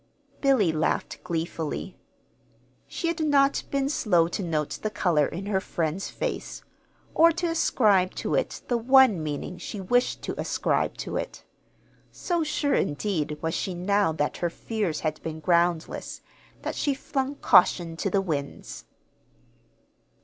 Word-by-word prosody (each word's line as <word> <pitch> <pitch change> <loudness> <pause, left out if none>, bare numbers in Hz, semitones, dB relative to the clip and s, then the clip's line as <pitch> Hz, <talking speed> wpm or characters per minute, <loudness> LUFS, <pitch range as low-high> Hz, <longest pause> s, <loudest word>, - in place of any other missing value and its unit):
Billy 260 - +4
laughed 155 0 -1
gleefully. 165 -3 -3 0.9
She 340 - -3
had 335 0 -1
not 280 -3 +3
been 275 -1 0
slow 180 - +2
to 185 - -3
note 155 -5 -2
the 215 - -1
color 175 -8 +2
in 185 +4 -6
her 195 -2 0
friend's 165 +1 -2
face, - - -4 0.5
or 335 +1 +6
to 350 +2 -2
ascribe 205 - +3
to - - -3
it - - -1
the 240 -1 +1
one 255 -6 +5
meaning 155 +4 -4
she 200 +4 -6
wished 245 +6 +1
to - - -3
ascribe - - 0
to - - -4
it. - - -5 0.7
So 345 -2 -1
sure, 300 -2 0
indeed, 150 -1 -1
was 160 0 -1
she 185 - -2
now 200 0 +2
that 150 -1 -1
her 175 - -1
fears 200 -3 -3
had 155 -1 -2
been 160 -1 -5
groundless, 170 0 0 0.4
that - - -2
she 285 -2 0
flung 270 +1 -3
caution 175 -8 +4
to 195 - -1
the 195 +1 +2
winds. 145 -7 -5
190 Hz, 145 wpm, -26 LUFS, 165-265 Hz, 0.9 s, or